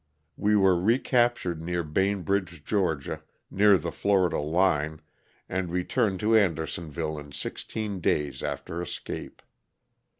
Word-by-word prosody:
We 105 +1 +2
were 95 -3 +4
recaptured 120 -5 +2
near 85 +1 -2
Bainbridge, 90 -1 -1
Ga., 90 -9 0 0.3
near 100 0 +6
the 75 - -4
Florida 95 -3 +2
line, 80 -1 +1 0.5
and 95 -1 -2
returned 90 +2 0
to 110 +1 +3
Andersonville 80 -5 0
in 75 -1 -11
sixteen 100 +7 -4
days 75 -4 0
after 85 +1 -4
escape. 85 - -6
90 Hz, 110 wpm, -27 LUFS, 80-100 Hz, 0.5 s, near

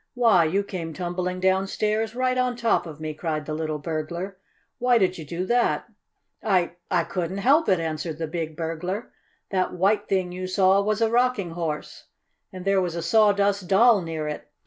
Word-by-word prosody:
Why, 225 -9 +5
you 195 +6 +1
came 170 -5 -5
tumbling 180 0 -3
downstairs 210 +4 0
right 255 0 +1
on 250 -1 +1
top 230 -6 +1
of 155 -2 -9
me!" 155 0 -4
cried 155 -1 -3
the 155 - -4
little 155 -1 -2
burglar. 170 +5 -4 0.4
"Why 245 0 +4
did 185 -4 +1
you - - -6
do 170 +5 -3
that?" 240 +3 +1 0.6
"I 180 -4 +1
I 175 -2 +2
couldn't 175 +2 -3
help 275 +8 +3
it," 185 -3 +3
answered 160 0 -3
the 165 - -2
big 160 -1 -4
burglar. 175 +6 -4 0.4
"That 185 -2 0
white 205 +3 +2
thing 185 -2 0
you 185 +1 -5
saw 190 +1 +4
was 215 +2 -1
a 225 -1 +2
Rocking 240 -7 +1
Horse, 165 -3 -5 0.5
and 185 -1 -8
there 195 -1 +3
was 175 -2 -2
a 170 - -3
Sawdust 200 0 +3
Doll 210 +2 +5
near 160 -2 -4
it. 150 - -5
185 Hz, 185 wpm, -25 LUFS, 165-210 Hz, 0.6 s, Why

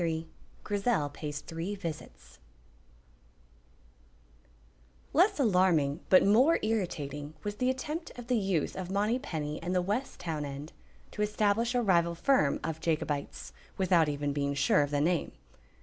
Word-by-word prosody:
CHAPTER 170 - +1
XXIII 160 0 -3 0.4
GRIZEL 205 -7 0
PAYS 145 0 -6
THREE 165 +6 -5
VISITS 160 - -8 2.7
Less 370 +3 +4
alarming 180 - +3
but 185 - +7
more 250 +11 +5
irritating 155 -9 -2
was 205 0 -4
the 250 +2 +1
attempt 300 +6 -3
of 245 - -7
the 250 +1 +1
youth 190 -6 -1
of 185 -1 -5
Monypenny 200 - -1
and 180 +2 -2
the 180 - +3
West 210 +8 -2
town 160 -4 -3
end, 145 +2 -7 0.4
to - - -5
establish 210 +3 +1
a 245 - +2
rival 170 -4 +2
firm 250 - +2
of 160 -1 -3
Jacobites 155 -3 -2 0.2
(without 180 -5 +3
even 145 0 -2
being 140 0 -1
sure 140 +1 +3
of 145 - 0
the 145 0 0
name). 170 +2 0
175 Hz, 145 wpm, -30 LUFS, 150-210 Hz, 2.7 s, but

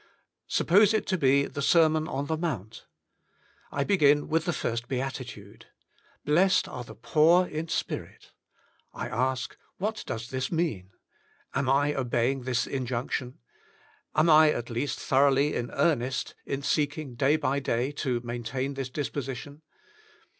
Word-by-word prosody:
Suppose 205 +5 +4
it 215 - 0
to 185 - +1
be 140 -1 +4
the 140 - -6
Sermon 155 +1 +4
on 140 +1 -3
the 160 - -1
Mount. 130 - -5 0.8
I 140 - 0
begin 145 -5 +3
with 160 +1 +1
the 175 - +1
first 115 -6 -3
Beatitude: 125 -6 -6 0.6
"Blessed 180 +6 +3
are 125 - -6
the - - -12
poor 170 +4 +4
in 155 -1 -5
spirit." - - -4 0.6
I - - -4
ask 130 0 -1
— - - -41
^What 215 +3 -2
does 115 -2 -5
this 130 -1 -2
mean? 155 - -1 0.6
Am 130 - 0
I 145 +2 +3
obeying 125 0 0
this 125 -2 0
injunction? 125 -1 -3 0.8
Am 155 +2 +4
I 155 -1 +7
at 120 -5 -3
least 120 +5 -2
thoroughly 140 +2 +3
in 120 0 -2
earnest 130 -5 0
in 140 +1 -3
seeking 145 -1 -1
day 135 +5 +2
by 140 -3 0
day 125 0 -1
to 130 -4 -2
maintain 120 +3 -3
this 135 -1 -4
disposition? 140 +1 -5
140 Hz, 145 wpm, -27 LUFS, 125-155 Hz, 0.8 s, I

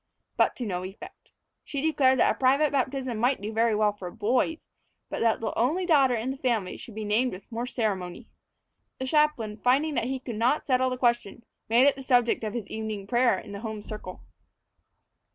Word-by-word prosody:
But - - +2
to 245 - -4
no 180 -3 -3
effect. 190 +2 -11 0.3
She 285 - -4
declared 275 -3 +3
that - - +3
a - - -23
private 275 +3 +3
baptism 260 -3 -1
might 250 +3 +2
do 210 +2 -5
very 225 0 +2
well 210 -1 +2
for 190 -3 -7
boys, 240 - 0 0.5
but - - -3
that 225 -1 +2
the 225 - -2
only 310 +11 +1
daughter 275 -7 +4
in 235 +3 -2
the 270 - -6
family 230 -8 -1
should 225 - -11
be 215 -1 -4
named 230 +5 +1
with 190 +5 -11
more 235 +2 -3
ceremony. 195 -8 -3 0.7
The 260 - -4
chaplain, 265 -7 +1
finding 270 +7 +2
that 240 - 0
he 265 +2 -2
could 240 -4 -6
not 245 +7 +1
settle 260 -1 +2
the 255 - -3
question, 240 -2 0 0.3
made 235 +4 +5
it 285 - +4
the 270 - -8
subject 245 -3 +2
of 215 +1 -3
his 225 -4 -4
evening 215 -2 -5
prayer 240 -1 +3
in 200 - -9
the 200 - -6
home 220 -1 -6
circle. 210 -4 -8
240 Hz, 205 wpm, -27 LUFS, 215-260 Hz, 0.7 s, made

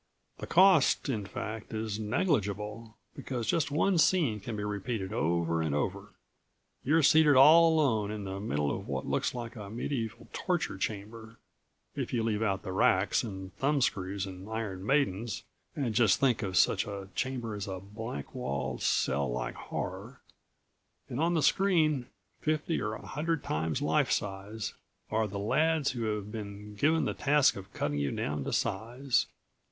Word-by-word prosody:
The - - -6
cost, 180 -6 +5
in 105 -6 -2
fact, 110 +3 -6
is 110 -1 -3
negligible, 110 - -1 0.2
because 130 -5 -4
just 160 +7 +1
one 170 +5 +2
scene 155 -11 +3
can 110 +3 -5
be 105 - -3
repeated 105 -1 -3
over 85 0 +1
and 80 -3 -1
over. 75 - -3 0.7
You're 155 +4 +3
seated 150 0 +6
all 160 +5 +8
alone 115 -10 +2
in 105 -1 -4
the 95 0 -5
middle 75 -8 -1
of - - -7
what - - -3
looks - - -1
like 120 -1 -6
a 105 -3 -8
medieval 115 0 -4
torture 175 - -1
chamber 110 +3 -5 0.6
if - - -3
you 115 -2 +1
leave 110 -1 0
out 100 -3 0
the 95 - -5
racks 95 +1 +3
and 95 -4 -7
thumbscrews 100 -9 0
and 95 +1 -9
iron 105 -4 -4
maidens 115 -5 0 0.3
and 130 -6 -1
just 115 -4 +4
think 130 -5 +2
of 95 -4 -2
such - - +3
a 100 -2 -6
chamber 125 -4 -2
as 105 0 -4
a 95 -1 -4
blank 110 +5 -7
walled, 95 - -3
cell 70 0 +1
like - - -3
horror - - -6 0.9
and 120 - -4
on 170 +2 +2
the 160 - +2
screen, 155 -6 +3 0.3
fifty 155 +1 0
or 105 0 -2
a - - -8
hundred 160 +2 -2
times 80 0 -1
lifesize, 105 +2 -1 0.4
are 110 0 +1
the 100 0 -6
lads 155 +8 +2
who 120 -3 -3
have 105 -1 -3
been 105 -1 -7
given 155 +9 +2
the - - -1
task 145 -1 +3
of 95 0 -9
cutting 75 0 -2
you 70 -1 0
down 75 0 -2
to - - -3
size. 125 +3 0
110 Hz, 165 wpm, -30 LUFS, 100-135 Hz, 0.9 s, all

